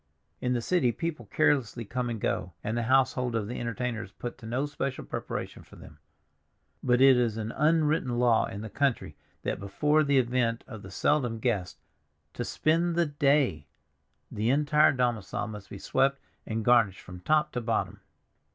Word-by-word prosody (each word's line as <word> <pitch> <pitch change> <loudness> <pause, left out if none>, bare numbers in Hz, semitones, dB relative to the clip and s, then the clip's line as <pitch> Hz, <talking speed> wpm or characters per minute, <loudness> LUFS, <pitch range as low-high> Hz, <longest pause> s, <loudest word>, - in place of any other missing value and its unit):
In 125 0 0
the 120 -2 -1
city 165 -8 +2
people 155 - -5
carelessly 120 0 +1
come 125 +3 -3
and 115 -2 -4
go, 90 -2 -2
and 110 - -2
the 120 - 0
household 130 -2 +2
of 110 -3 -1
the 120 - -5
entertainer 120 0 -3
is 95 - -10
put 120 +3 -7
to 110 - -10
no 125 +5 -1
special 140 -2 -4
preparation - - -5
for - - -17
them, - - -14 0.8
but 125 0 +2
it 135 -1 +7
is 115 -3 +1
an 110 0 -3
unwritten 150 -4 +1
law 120 -2 +3
in 100 - -7
the 110 - -6
country 115 - -1 0.3
that - - -2
before 150 +10 +2
the 140 -1 +2
advent 120 -2 +1
of 110 -5 -9
the 95 - -10
seldom 120 +3 +1
guest 110 -6 -2 0.6
"to 120 - -3
spend 165 +6 +1
the 170 0 +3
day" 140 - +1 0.6
the 110 +3 -1
entire 150 +2 +4
domicile 120 -6 -1
must 105 -2 -9
be 100 - -8
swept 135 +6 +1 0.3
and 110 -1 -3
garnished 115 -6 +4
from 90 -1 -10
top 155 +12 +1
to 125 - -3
bottom. 115 -1 -2
120 Hz, 180 wpm, -28 LUFS, 110-140 Hz, 0.8 s, it